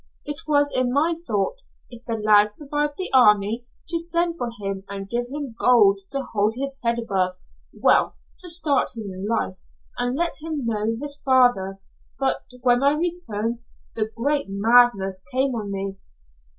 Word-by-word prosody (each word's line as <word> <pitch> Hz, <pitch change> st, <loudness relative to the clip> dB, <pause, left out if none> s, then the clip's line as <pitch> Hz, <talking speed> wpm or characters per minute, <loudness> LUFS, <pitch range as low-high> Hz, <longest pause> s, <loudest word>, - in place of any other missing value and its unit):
It 295 Hz, +1 st, -6 dB
was 290 Hz, -1 st, +3 dB
in 255 Hz, -1 st, +2 dB
my 305 Hz, +6 st, +2 dB
thought, 210 Hz, -, -1 dB, 0.3 s
if 240 Hz, -1 st, -12 dB
the 230 Hz, -, -2 dB
lad 210 Hz, -1 st, +4 dB
survived 295 Hz, 0 st, -2 dB
the 370 Hz, -, -4 dB
army, 220 Hz, -1 st, +4 dB, 0.2 s
to 335 Hz, -, 0 dB
send 340 Hz, 0 st, 0 dB
for 245 Hz, -7 st, -3 dB
him 195 Hz, -4 st, -5 dB
and 195 Hz, -1 st, -6 dB
give 240 Hz, +3 st, -2 dB
him 280 Hz, -2 st, -6 dB
gold 210 Hz, -6 st, +5 dB
to 275 Hz, 0 st, -1 dB
hold 210 Hz, +1 st, +1 dB
his 275 Hz, +1 st, -3 dB
head 235 Hz, -1 st, 0 dB
above 190 Hz, -5 st, 0 dB, 0.4 s
well -, -, +2 dB, 0.2 s
to 360 Hz, -, -2 dB
start 315 Hz, -5 st, +1 dB
him 210 Hz, -3 st, -5 dB
in 190 Hz, +2 st, -5 dB
life, 95 Hz, -, -1 dB, 0.4 s
and 245 Hz, +2 st, -1 dB
let 340 Hz, +1 st, -1 dB
him 310 Hz, -5 st, -4 dB
know 220 Hz, 0 st, 0 dB
his 285 Hz, 0 st, -4 dB
father, 245 Hz, -8 st, +3 dB, 0.4 s
but 270 Hz, -1 st, +1 dB, 0.2 s
when 245 Hz, 0 st, +3 dB
I 280 Hz, +1 st, +4 dB
returned, 240 Hz, -10 st, -2 dB, 0.4 s
the 220 Hz, -1 st, -1 dB
great 285 Hz, +2 st, 0 dB
madness 200 Hz, -2 st, +3 dB
came 260 Hz, +1 st, +1 dB
on 210 Hz, -4 st, -4 dB
me. 195 Hz, 0 st, -4 dB
240 Hz, 165 wpm, -23 LUFS, 210-285 Hz, 0.4 s, gold